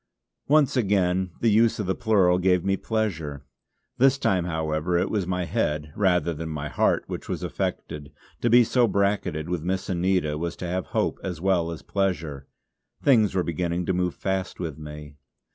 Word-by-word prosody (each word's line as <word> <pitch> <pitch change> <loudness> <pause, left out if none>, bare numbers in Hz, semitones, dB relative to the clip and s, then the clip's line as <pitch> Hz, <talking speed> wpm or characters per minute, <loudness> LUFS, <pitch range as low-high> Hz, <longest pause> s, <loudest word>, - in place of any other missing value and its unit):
Once 145 -2 +4
again 95 -5 +1
the 115 - +3
use 115 +2 +4
of 105 - -2
the 95 - 0
plural 95 -5 +3
gave 90 -1 +2
me 95 0 +2
pleasure. 80 -11 -3 0.5
This 135 +1 +5
time, 95 -9 +1
however, 80 +1 -1
it 85 - 0
was 100 -5 -1
my 90 -1 -1
head, 75 -2 -2
rather 90 -5 +2
than 80 +1 -5
my 75 -1 -4
heart, - - +1
which - - -7
was - - -3
affected; 75 -1 -4 0.3
to 120 - +2
be 120 +1 +7
so 120 +1 +2
bracketted 100 -6 0
with 90 -2 -2
Miss 95 +4 -2
Anita 90 -4 0
was 85 0 -3
to 90 - -6
have 90 +1 -2
hope - - -1
as 90 -4 -4
well 90 -2 +1
as 85 - -7
pleasure. 80 -8 -2 0.6
Things 110 -8 +4
were 90 - +2
beginning 85 +1 -2
to 95 - 0
move 90 -1 -1
fast 95 0 -3
with 80 -5 -5
me. 75 -1 -9
90 Hz, 180 wpm, -25 LUFS, 80-100 Hz, 0.6 s, be